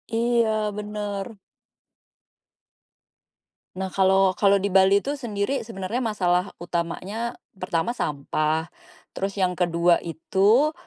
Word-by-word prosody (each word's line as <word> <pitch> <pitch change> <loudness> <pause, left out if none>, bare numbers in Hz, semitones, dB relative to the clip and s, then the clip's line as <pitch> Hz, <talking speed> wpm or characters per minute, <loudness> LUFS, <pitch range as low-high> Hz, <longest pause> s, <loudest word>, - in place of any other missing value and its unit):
Iya, 235 0 +2 0.3
benar. 210 0 -5 2.4
Nah, 190 0 -4
kalau 190 0 +4
kalau 200 -1 +4
di 200 0 -1
Bali 190 +1 +5
itu 285 +1 -3
sendiri 225 +1 -2
sebenarnya 195 +2 -3
masalah 185 -6 +1 0.2
utamanya, 180 +7 -3 0.2
pertama 185 +1 -2
sampah. 155 - -1 0.4
Terus 195 0 -3
yang 185 -2 0
ke-2 170 -1 +3
itu, 200 - +2
195 Hz, 100 wpm, -24 LUFS, 180-215 Hz, 2.4 s, Bali